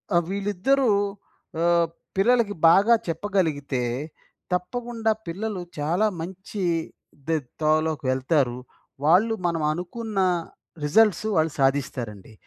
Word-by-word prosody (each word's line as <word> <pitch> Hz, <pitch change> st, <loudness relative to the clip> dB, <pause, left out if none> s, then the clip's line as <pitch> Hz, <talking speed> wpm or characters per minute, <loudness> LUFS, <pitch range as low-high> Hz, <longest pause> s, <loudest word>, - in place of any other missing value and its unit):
ఆహ్, 170 Hz, -, +4 dB
వీళ్ళిద్దరూ 205 Hz, +7 st, +1 dB, 0.8 s
ఆహ్, 170 Hz, -1 st, +3 dB, 0.3 s
పిల్లలకి 225 Hz, 0 st, +3 dB
బాగా 200 Hz, +7 st, +6 dB
చెప్పగలిగితే, 160 Hz, -7 st, -1 dB, 0.7 s
తప్పకుండా 225 Hz, +4 st, -1 dB, 0.2 s
పిల్లలు 195 Hz, +2 st, -3 dB, 0.2 s
చాలా 170 Hz, +9 st, +2 dB
మంచి 190 Hz, +3 st, -6 dB, 0.6 s
దె 165 Hz, -1 st, +2 dB, 0.2 s
తోవలోకి 155 Hz, -1 st, +1 dB
వెళ్తారు. 130 Hz, -1 st, +1 dB, 0.5 s
వాళ్ళు 190 Hz, +8 st, +4 dB
మనం 165 Hz, -2 st, -1 dB
అనుకున్న 195 Hz, +6 st, -4 dB, 0.6 s
రిజట్ల్సు 210 Hz, +6 st, +3 dB
వాళ్ళు 160 Hz, 0 st, +2 dB
సాధిస్తారండి. 130 Hz, -7 st, -1 dB
175 Hz, 90 wpm, -24 LUFS, 155-210 Hz, 0.8 s, బాగా